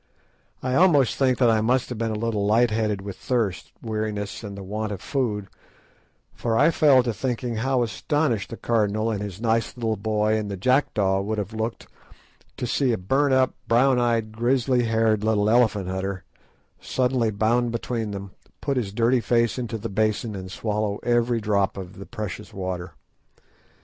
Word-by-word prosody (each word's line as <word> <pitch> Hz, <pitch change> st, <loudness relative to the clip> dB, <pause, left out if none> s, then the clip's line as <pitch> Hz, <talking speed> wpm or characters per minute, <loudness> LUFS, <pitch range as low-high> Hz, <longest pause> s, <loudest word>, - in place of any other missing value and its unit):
I 130 Hz, 0 st, -1 dB
almost 145 Hz, -, +4 dB
think 130 Hz, -2 st, +2 dB
that 120 Hz, -3 st, +4 dB
I 110 Hz, -1 st, +2 dB
must 125 Hz, +3 st, +1 dB
have 125 Hz, -, -5 dB
been 115 Hz, -1 st, 0 dB
a 110 Hz, -, -2 dB
little 110 Hz, -1 st, -1 dB
light 110 Hz, +3 st, +3 dB
headed 105 Hz, -2 st, 0 dB
with 100 Hz, -2 st, -7 dB
thirst, 115 Hz, -7 st, -2 dB
weariness 110 Hz, -2 st, -3 dB
and 100 Hz, -2 st, -7 dB
the 100 Hz, -, -7 dB
want 105 Hz, +2 st, -3 dB
of 100 Hz, -, -4 dB
food; 115 Hz, -6 st, -2 dB, 0.9 s
for 115 Hz, -1 st, -1 dB
I 150 Hz, +7 st, +5 dB
fell 140 Hz, -6 st, +5 dB
to 120 Hz, -2 st, -1 dB
thinking 120 Hz, 0 st, -3 dB
how 130 Hz, +2 st, +1 dB
astonished 120 Hz, -1 st, -1 dB
the 115 Hz, -, -7 dB
Cardinal 110 Hz, -1 st, 0 dB
and 105 Hz, -2 st, -3 dB
his 100 Hz, -2 st, -6 dB
nice 115 Hz, +1 st, 0 dB
little 110 Hz, -2 st, -1 dB
boy 110 Hz, +1 st, +1 dB
and 105 Hz, -1 st, -3 dB
the 100 Hz, -, -4 dB
jackdaw 100 Hz, -4 st, +2 dB
would 110 Hz, +2 st, -2 dB
have 105 Hz, +1 st, -4 dB
looked 110 Hz, +1 st, -3 dB, 0.7 s
to -, -, -2 dB
see 130 Hz, +2 st, +1 dB
a -, -, 0 dB
burnt 135 Hz, +9 st, +2 dB
up, 130 Hz, -1 st, +3 dB
brown 125 Hz, +2 st, +4 dB
eyed, 115 Hz, -2 st, +1 dB
grizzly 120 Hz, +2 st, +1 dB
haired 110 Hz, -2 st, +2 dB
little 105 Hz, -1 st, +2 dB
elephant 110 Hz, -4 st, +3 dB
hunter 95 Hz, 0 st, -3 dB, 0.6 s
suddenly 125 Hz, -3 st, 0 dB
bound 115 Hz, +3 st, +1 dB
between 115 Hz, -1 st, -3 dB
them, 100 Hz, -1 st, -6 dB, 0.3 s
put 140 Hz, -2 st, -1 dB
his 110 Hz, -6 st, -1 dB
dirty 120 Hz, +4 st, +2 dB
face 115 Hz, +2 st, +1 dB
into 120 Hz, -2 st, -3 dB
the 105 Hz, -, -5 dB
basin, 110 Hz, +2 st, -1 dB
and 95 Hz, -1 st, -7 dB
swallow 105 Hz, 0 st, -2 dB
every 120 Hz, 0 st, +2 dB
drop 100 Hz, -2 st, 0 dB
of 95 Hz, 0 st, -8 dB
the 100 Hz, -, -9 dB
precious 105 Hz, -2 st, -6 dB
water. 95 Hz, -2 st, -5 dB
110 Hz, 180 wpm, -24 LUFS, 105-120 Hz, 0.9 s, I